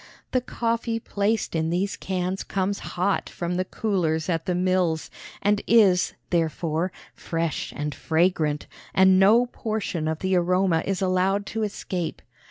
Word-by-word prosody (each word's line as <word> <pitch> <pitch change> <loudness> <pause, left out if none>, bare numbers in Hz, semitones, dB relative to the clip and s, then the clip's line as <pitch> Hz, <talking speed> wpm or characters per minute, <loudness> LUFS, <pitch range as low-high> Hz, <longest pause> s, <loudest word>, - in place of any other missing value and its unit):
The 255 - +2
coffee 230 -1 -1
placed 210 0 -1
in 160 0 0
these 185 +4 0
cans 185 0 -2
comes 195 +1 -1 0.2
hot 190 +2 +1
from 175 0 -3
the 185 +1 0
coolers 175 -7 -1
at 165 -2 -1
the 180 - +1
mills, 180 -3 +1 0.3
and 205 0 +3
is, 200 -6 +4 0.2
therefore, 165 +1 0 0.2
fresh 165 -1 -3
and 150 0 -3
fragrant, 160 -3 +1 0.3
and 190 0 +6
no 220 +6 +6
portion 215 -9 -3
of 160 0 -1
the 190 +2 0
aroma 180 -1 +2
is 195 -1 0
allowed 190 +2 +1
to 225 - -1
escape. 185 -5 -3
185 Hz, 145 wpm, -25 LUFS, 165-200 Hz, 0.3 s, and